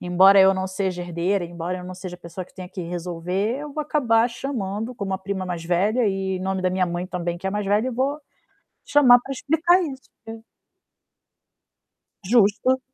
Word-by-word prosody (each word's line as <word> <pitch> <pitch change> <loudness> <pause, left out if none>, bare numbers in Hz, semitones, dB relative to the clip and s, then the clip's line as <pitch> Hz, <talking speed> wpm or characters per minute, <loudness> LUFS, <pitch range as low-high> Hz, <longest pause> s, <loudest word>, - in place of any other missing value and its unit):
embora 190 +2 +6
eu 190 0 +6
não 190 0 -2
seja 190 -1 -3
herdeira, 175 +2 -1
embora 175 +1 -5
eu 180 - -9
não 185 - -7
seja 180 -1 -7
a - - -31
pessoa 170 +1 -8
que - - -25
tenha 185 -1 -8
que 185 - -7
resolver, 180 +6 -3
eu 295 -1 -7
vou 305 +1 -2
acabar 240 -6 +2
chamando, 235 -2 -4
como 200 -4 -4
a - - -3
prima 190 -1 -4
mais 175 -2 -4
velha 205 +7 +1
e, 190 -1 -2
em - - -6
nome 190 0 -2
da 185 - +1
minha 185 0 +1
mãe 175 +1 -3
também, 175 -2 -3
que 190 - -6
é - - 0
mais 205 0 -2
velha, 210 +5 +2
e - - -1
vou 270 +5 -1 0.7
chamar 255 -4 +6
pra 270 +3 -9
explicar 325 +7 +2
isso, 265 -4 -7 0.2
e 225 0 -7 1.9
Justo. 230 +4 +3
195 Hz, 200 wpm, -23 LUFS, 180-240 Hz, 1.9 s, embora